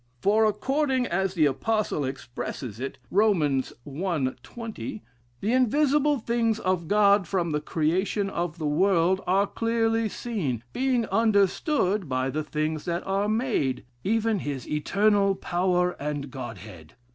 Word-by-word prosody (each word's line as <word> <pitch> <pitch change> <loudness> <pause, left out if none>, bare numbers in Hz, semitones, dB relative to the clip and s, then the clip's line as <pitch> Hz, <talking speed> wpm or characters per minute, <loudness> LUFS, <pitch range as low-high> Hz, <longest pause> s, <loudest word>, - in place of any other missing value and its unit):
For 215 - +3
according 265 +5 +1
as 190 -1 -1
the 160 -3 +4
apostle 210 +3 0
expresses 125 -3 -6
it, 135 +1 -5
Rom. 205 -4 +3 0.4
i., 150 -2 -1
20, 220 - -7 0.4
the 220 +4 0
invisible 290 +3 +3
things 230 -2 0
of 185 -5 -1
God 200 -1 +4
from 175 -4 0
the 150 0 0
creation 180 +7 0
of 175 -3 -3
the 160 - -4
world 185 +4 +2
are 195 +2 +3
clearly 225 0 0
seen, 165 - -3
being 255 -3 +1
understood 205 - +2
by 130 +1 0
the 155 +2 -2
things 155 0 -2
that 170 0 -2
are 195 +2 0
made, 215 - 0 0.2
even 225 0 +1
his 140 -6 -5
eternal 200 +5 +2
power 180 0 +1
and 145 -2 -3
Godhead. 105 - -9
190 Hz, 135 wpm, -26 LUFS, 150-220 Hz, 0.4 s, the